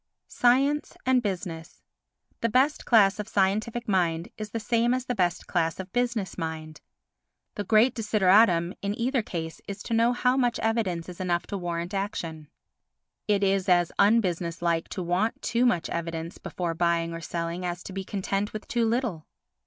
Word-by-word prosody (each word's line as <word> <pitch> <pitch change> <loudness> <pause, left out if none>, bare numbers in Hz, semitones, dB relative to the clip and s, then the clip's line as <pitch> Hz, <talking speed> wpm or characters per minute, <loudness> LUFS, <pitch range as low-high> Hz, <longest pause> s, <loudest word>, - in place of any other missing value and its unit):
Science 275 +4 +2
and 255 -1 +4
Business 175 -6 -5 0.6
The 230 - 0
best 265 +6 +2
class 200 -4 +5
of 210 - -4
scientific 215 +5 0
mind 175 -4 +1
is 215 -1 -6
the 230 - -3
same 235 +2 +2
as 255 0 -3
the 250 - -1
best 180 -6 0
class 165 -1 -1
of 190 0 -7
business 235 -7 -1
mind. 160 -1 -5 0.7
The 205 - -4
great 220 +5 +4
desideratum 195 -5 +3
in 200 +1 -2
either 255 +2 +1
case 165 -5 -6
is 200 0 -6
to - - -4
know 230 +1 +4
how 250 +1 +2
much 245 -3 +1
evidence 210 -7 -1
is 180 -1 -9
enough 175 -2 0
to 205 - -5
warrant 175 +1 -3
action. 165 -6 -4 0.8
It 205 -1 +2
is 195 -1 +1
as 175 -1 +4
unbusiness 180 -5 +2
like 170 -1 0
to 185 - -4
want 180 +6 0
too 235 +2 +2
much 175 -8 +1
evidence 165 0 -4
before 175 -2 -3
buying 170 0 0
or 165 - -6
selling 170 +1 -4
as 175 0 -4
to 190 - -8
be 195 0 -4
content 195 +1 -2
with 215 - -7
too 235 -1 +1
little. 225 -9 -1
195 Hz, 175 wpm, -27 LUFS, 170-230 Hz, 0.8 s, class